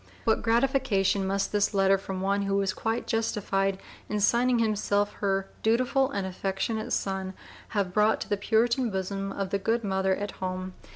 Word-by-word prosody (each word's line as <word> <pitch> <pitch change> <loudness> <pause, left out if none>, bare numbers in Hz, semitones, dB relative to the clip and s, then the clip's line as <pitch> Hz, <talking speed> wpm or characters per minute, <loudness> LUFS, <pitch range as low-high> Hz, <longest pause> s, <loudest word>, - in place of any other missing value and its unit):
What 220 - +2
gratification 225 -5 +2
must 195 +1 0
this 205 0 +1
letter 195 0 +4
from 190 -1 -5
one 200 +1 +1
who 195 0 0
was 195 -1 +1
quite 225 +4 -2
justified 195 -3 0 0.3
in 210 - -1
signing 240 +4 +3
himself 205 -2 +1
her 195 -1 0
"dutiful 255 +4 +2
and 200 -8 -2
affectionate 195 +4 -3
son" 190 -1 -2 0.4
have 190 -3 0
brought 215 +2 +3
to - - -4
the 205 - +2
Puritan 235 +4 +1
bosom 195 0 -3
of 195 -1 -4
the 200 - +1
good 225 +4 0
mother 190 -1 +1
at 205 +1 -4
home! 185 0 -5
200 Hz, 170 wpm, -27 LUFS, 195-225 Hz, 0.4 s, letter